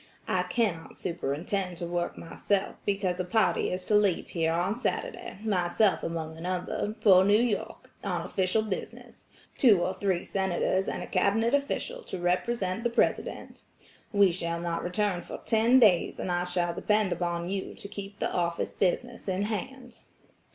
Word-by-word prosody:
I -, -, +1 dB
cannot 195 Hz, -9 st, -1 dB
superintend 175 Hz, +2 st, -2 dB
to 170 Hz, -, -4 dB
work 175 Hz, 0 st, -2 dB
myself 195 Hz, +4 st, -1 dB
because 195 Hz, -3 st, 0 dB
a -, -, +1 dB
party 220 Hz, +4 st, +2 dB
is 185 Hz, 0 st, -3 dB
to 210 Hz, -, -1 dB
leave 205 Hz, -4 st, +3 dB
here 165 Hz, -2 st, 0 dB
on 175 Hz, +4 st, +1 dB
Saturday, 250 Hz, -, -3 dB
myself 195 Hz, 0 st, +2 dB
among 160 Hz, -1 st, -4 dB
the 160 Hz, -, -11 dB
number, 185 Hz, +4 st, -2 dB
for 190 Hz, -3 st, +7 dB
New 205 Hz, +2 st, +5 dB
York, 235 Hz, -3 st, -2 dB
on -, -, -1 dB
official 190 Hz, +3 st, 0 dB
business–two 210 Hz, +1 st, -1 dB
or 185 Hz, +2 st, 0 dB
three 185 Hz, -2 st, -1 dB
Senators 190 Hz, 0 st, 0 dB
and -, -, -3 dB
a -, -, -5 dB
Cabinet 215 Hz, +6 st, +1 dB
official 285 Hz, -, -1 dB
to -, -, -5 dB
represent 185 Hz, +3 st, 0 dB
the 240 Hz, -, +2 dB
President. 235 Hz, -, -1 dB, 0.5 s
We 200 Hz, -3 st, +5 dB
shall 170 Hz, -1 st, -2 dB
not 170 Hz, 0 st, -2 dB
return 180 Hz, 0 st, 0 dB
for -, -, -7 dB
ten 230 Hz, +3 st, +4 dB
days 205 Hz, -9 st, +4 dB
and 185 Hz, -, -3 dB
I 175 Hz, 0 st, 0 dB
shall 175 Hz, -1 st, 0 dB
depend 210 Hz, +1 st, +1 dB
upon 175 Hz, -1 st, -2 dB
you 195 Hz, 0 st, -3 dB
to -, -, -8 dB
keep 200 Hz, 0 st, -8 dB
the -, -, -2 dB
office 170 Hz, -1 st, -1 dB
business 235 Hz, +6 st, -1 dB
in 190 Hz, +1 st, 0 dB
hand." 245 Hz, +4 st, -5 dB
190 Hz, 165 wpm, -28 LUFS, 175-215 Hz, 0.5 s, for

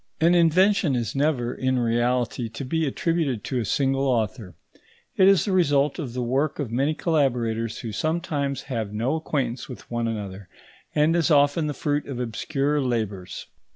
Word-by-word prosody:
An 165 Hz, +2 st, +4 dB
invention 175 Hz, -1 st, +4 dB
is 115 Hz, -3 st, -2 dB
never, 135 Hz, -4 st, 0 dB
in 130 Hz, 0 st, 0 dB
reality, 120 Hz, 0 st, 0 dB
to 125 Hz, +5 st, -6 dB
be 160 Hz, +4 st, 0 dB
attributed 150 Hz, -5 st, -1 dB
to 130 Hz, -, -2 dB
a 115 Hz, -, -2 dB
single 135 Hz, +4 st, +1 dB
author. 110 Hz, -6 st, -1 dB, 0.6 s
It 190 Hz, -, +5 dB
is 195 Hz, -4 st, +5 dB
the 205 Hz, -, -1 dB
result 145 Hz, -5 st, +2 dB
of 135 Hz, -7 st, -5 dB
the 125 Hz, 0 st, -2 dB
work 135 Hz, +5 st, 0 dB
of 140 Hz, -7 st, -4 dB
many 140 Hz, +6 st, +1 dB
collaborators 120 Hz, -9 st, 0 dB
who 115 Hz, -, -5 dB
sometimes 150 Hz, -, -2 dB
have 115 Hz, -6 st, -4 dB
no 115 Hz, +6 st, -1 dB
acquaintance 135 Hz, -6 st, -2 dB
with 125 Hz, -, -10 dB
one 120 Hz, -1 st, -1 dB
another, 100 Hz, -4 st, -5 dB, 0.5 s
and 150 Hz, +2 st, +3 dB
is 170 Hz, -2 st, +2 dB
often 145 Hz, +1 st, +3 dB
the 145 Hz, -, -3 dB
fruit 145 Hz, 0 st, -1 dB
of 135 Hz, -3 st, -5 dB
obscure 135 Hz, +5 st, -1 dB
labours. 110 Hz, -7 st, -3 dB
135 Hz, 170 wpm, -24 LUFS, 115-150 Hz, 0.6 s, It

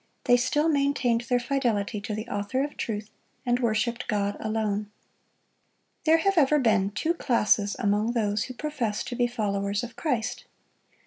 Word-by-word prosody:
They 245 Hz, -, +5 dB
still 295 Hz, +5 st, +2 dB
maintained 280 Hz, -6 st, +2 dB
their 245 Hz, -1 st, +3 dB
fidelity 240 Hz, -5 st, -1 dB
to 215 Hz, 0 st, -4 dB
the 215 Hz, +2 st, -5 dB
Author 205 Hz, +5 st, -1 dB
of 290 Hz, -, -5 dB
truth, 210 Hz, -1 st, -4 dB, 0.3 s
and 245 Hz, 0 st, +2 dB
worshiped 235 Hz, +1 st, 0 dB
God 205 Hz, -2 st, 0 dB
alone. 215 Hz, -1 st, -1 dB, 1.2 s
There 320 Hz, +1 st, +6 dB
have 390 Hz, +2 st, +2 dB
ever 300 Hz, +1 st, +4 dB
been 215 Hz, -7 st, +3 dB
two 315 Hz, +11 st, 0 dB
classes 210 Hz, -9 st, +2 dB
among 210 Hz, +3 st, +1 dB
those 210 Hz, -3 st, 0 dB
who 255 Hz, -, -8 dB
profess 250 Hz, -8 st, -2 dB
to 245 Hz, -, -5 dB
be 245 Hz, 0 st, +2 dB
followers 200 Hz, -3 st, -1 dB
of 240 Hz, -1 st, -7 dB
Christ. 245 Hz, -4 st, -2 dB
235 Hz, 155 wpm, -27 LUFS, 210-260 Hz, 1.2 s, There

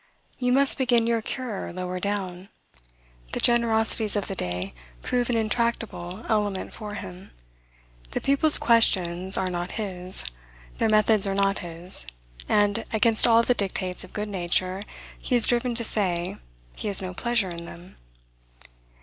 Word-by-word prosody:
You 250 Hz, -1 st, +1 dB
must 275 Hz, +2 st, +4 dB
begin 240 Hz, -3 st, +3 dB
your 230 Hz, -1 st, +1 dB
cure 235 Hz, -2 st, -5 dB
lower 180 Hz, 0 st, -4 dB
down." 190 Hz, -2 st, -4 dB, 0.8 s
The -, -, -1 dB
generosities 225 Hz, -2 st, +2 dB
of 205 Hz, -, -1 dB
the -, -, -4 dB
day 90 Hz, -, -4 dB, 0.3 s
prove 245 Hz, -1 st, -1 dB
an 240 Hz, -, +1 dB
intractable 220 Hz, -4 st, -2 dB
element 205 Hz, -3 st, -1 dB
for 210 Hz, -1 st, -7 dB
him. 185 Hz, -2 st, -9 dB, 0.8 s
The -, -, -3 dB
people's 280 Hz, +3 st, +4 dB
questions 190 Hz, -5 st, +3 dB
are 185 Hz, -1 st, -1 dB
not 175 Hz, 0 st, -4 dB
his; 185 Hz, -, 0 dB, 0.5 s
their -, -, +2 dB
methods 215 Hz, -1 st, +3 dB
are 195 Hz, -, -1 dB
not 195 Hz, 0 st, +1 dB
his; 170 Hz, -, -1 dB, 0.4 s
and, 205 Hz, -1 st, +2 dB
against 220 Hz, +1 st, +3 dB
all 230 Hz, 0 st, +5 dB
the 250 Hz, -, +2 dB
dictates 185 Hz, -4 st, -2 dB
of 185 Hz, -, -13 dB
good 210 Hz, 0 st, -4 dB
nature, 185 Hz, 0 st, -1 dB, 0.4 s
he 250 Hz, -, -1 dB
is 240 Hz, -, +7 dB
driven 240 Hz, 0 st, +1 dB
to 235 Hz, -, 0 dB
say, 180 Hz, -6 st, 0 dB, 0.4 s
he -, -, -5 dB
has 200 Hz, -2 st, +6 dB
no 185 Hz, 0 st, -5 dB
pleasure 235 Hz, -1 st, 0 dB
in 170 Hz, 0 st, -7 dB
them. 175 Hz, +2 st, -13 dB
205 Hz, 150 wpm, -25 LUFS, 185-230 Hz, 0.8 s, is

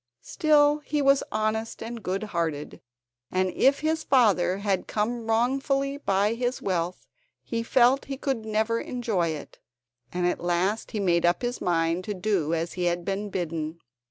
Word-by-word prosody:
Still, 295 Hz, -1 st, +3 dB
he 295 Hz, 0 st, -2 dB
was 275 Hz, -1 st, +4 dB
honest 215 Hz, +1 st, -2 dB
and 230 Hz, 0 st, -6 dB
good 190 Hz, +2 st, -2 dB
hearted, 165 Hz, -7 st, -3 dB, 0.5 s
and 185 Hz, 0 st, 0 dB
if 275 Hz, +8 st, +3 dB
his 315 Hz, +1 st, 0 dB
father 205 Hz, -8 st, +3 dB
had 200 Hz, -2 st, -1 dB
come 225 Hz, +2 st, -2 dB
wrongfully 275 Hz, +4 st, +1 dB
by 200 Hz, -4 st, +1 dB
his 245 Hz, +2 st, -2 dB
wealth 180 Hz, -2 st, -2 dB, 0.4 s
he 230 Hz, -1 st, -2 dB
felt 250 Hz, +3 st, +3 dB
he 270 Hz, -1 st, -5 dB
could 265 Hz, -5 st, -2 dB
never 220 Hz, +1 st, 0 dB
enjoy 225 Hz, -9 st, -1 dB
it, 155 Hz, -3 st, -6 dB, 0.5 s
and 180 Hz, 0 st, -1 dB
at 180 Hz, -, 0 dB
last 180 Hz, +5 st, 0 dB
he 215 Hz, -, -3 dB
made 175 Hz, -3 st, +2 dB
up 175 Hz, +5 st, +2 dB
his 245 Hz, 0 st, -2 dB
mind 165 Hz, 0 st, +1 dB
to 210 Hz, -, -3 dB
do 185 Hz, -5 st, 0 dB
as 165 Hz, +1 st, -3 dB
he 180 Hz, -1 st, -2 dB
had 175 Hz, 0 st, 0 dB
been 200 Hz, +2 st, -2 dB
bidden. 165 Hz, -3 st, -3 dB
210 Hz, 165 wpm, -26 LUFS, 175-245 Hz, 0.5 s, was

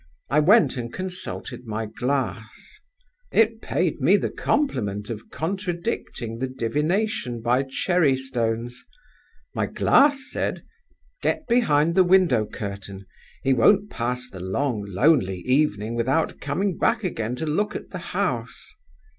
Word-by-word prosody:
I 150 Hz, -, +4 dB
went 195 Hz, -, +5 dB
and 120 Hz, -1 st, -4 dB
consulted 180 Hz, -9 st, -6 dB
my 110 Hz, +1 st, -3 dB
glass. 125 Hz, -, -4 dB, 0.5 s
It 225 Hz, 0 st, +3 dB
paid 160 Hz, +2 st, -1 dB
me 180 Hz, +10 st, +5 dB
the -, -, -2 dB
compliment 105 Hz, -, -1 dB
of 110 Hz, -1 st, -7 dB
contradicting 170 Hz, -, -4 dB
the 130 Hz, -, -1 dB
divination 145 Hz, -, -1 dB
by 125 Hz, +4 st, +1 dB
cherry 155 Hz, -2 st, +2 dB
stones. 120 Hz, -2 st, -3 dB, 0.7 s
My -, -, -1 dB
glass 280 Hz, -1 st, +3 dB
said: -, -, -2 dB, 0.6 s
'Get 310 Hz, -, 0 dB
behind 170 Hz, -10 st, +3 dB
the 185 Hz, +1 st, +5 dB
window 175 Hz, -, +4 dB
curtain; 100 Hz, -2 st, -7 dB, 0.4 s
he 135 Hz, -, +3 dB
won't 200 Hz, -, +4 dB
pass 125 Hz, +2 st, -2 dB
the 95 Hz, -6 st, -10 dB
long 105 Hz, +5 st, -1 dB
lonely 95 Hz, -, +2 dB
evening 120 Hz, -5 st, +1 dB
without 130 Hz, +7 st, 0 dB
coming 180 Hz, +7 st, -1 dB
back 225 Hz, -1 st, +2 dB
again 120 Hz, -, -2 dB
to 160 Hz, -, -4 dB
look 205 Hz, +8 st, -1 dB
at -, -, -7 dB
the 180 Hz, -, -5 dB, 0.2 s
house. 125 Hz, -, -2 dB
135 Hz, 130 wpm, -24 LUFS, 115-180 Hz, 0.7 s, went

